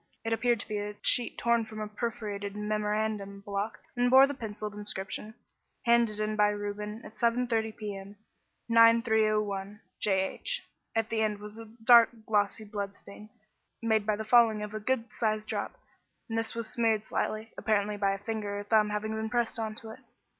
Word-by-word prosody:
It 225 - +1
appeared 235 0 +2
to - - -7
be 210 -1 -2
a 205 0 -4
sheet 245 - +2
torn 235 -1 +2
from 220 0 -8
a 215 - -3
perforated 210 -2 -4
memorandum 210 -1 -2
block, 200 +1 -3 0.2
and 245 0 +2
bore 265 +2 +9
the 285 - -3
pencilled 215 -4 -6
inscription: 205 +1 -4 0.5
"Handed 235 -3 +3
in 215 0 -1
by 210 -1 +4
Reuben 210 +1 -4
at - - -10
7.3 230 -2 0
p.m., 200 -1 -6 0.5
9.3.01. 220 -3 +3 0.2
J. 190 -2 +2
H." - - -3 0.3
At 225 -1 0
one 225 -1 +1
end 215 -1 +1
was 210 +2 -9
a 225 - -8
dark, 230 +1 +6 0.2
glossy 210 0 +1
blood 200 -1 -4
stain, 210 +1 -12 0.5
made 220 -2 +2
by 215 - +3
the 220 +1 -5
falling 220 -2 +5
of 210 0 -6
a 215 - -3
good 230 +1 -1
sized 215 -2 -1
drop, - - -3 0.5
and 225 - -4
this 225 0 -1
was 230 -1 -3
smeared 225 -3 +1
slightly, 220 0 -2
apparently 210 -1 0
by 200 -1 +1
a - - -3
finger 205 -1 -4
or - - -5
thumb 210 0 +3
having 210 +1 -2
been 220 0 -2
pressed 240 -1 0
on 220 -1 -2
it. 220 0 -9
215 Hz, 180 wpm, -30 LUFS, 210-225 Hz, 0.5 s, bore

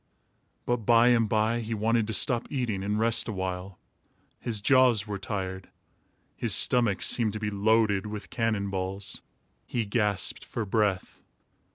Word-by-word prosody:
But 120 - +1
by 115 +2 +4
and 115 -3 +3
by, 110 +2 +1
he 115 0 -4
wanted 110 +1 +1
to 110 - -3
stop 120 +2 +2
eating 120 -8 -2
and 105 +1 -1
rest 115 0 +2
a - - -2
while. 95 -1 -5 0.6
His 115 -3 0
jaws 125 -2 +4
were 100 -2 -5
tired. 95 -2 -5 0.7
His - - +1
stomach 120 -6 +2
seemed 110 -4 +2
to 110 - -4
be 105 -1 -3
loaded 105 -1 +2
with 105 0 -8
cannon 110 -4 -1
balls. 95 +1 -3 0.5
He 120 -3 -2
gasped 105 -2 -1
for 115 - -4
breath. 100 -2 -1
110 Hz, 155 wpm, -27 LUFS, 100-115 Hz, 0.7 s, by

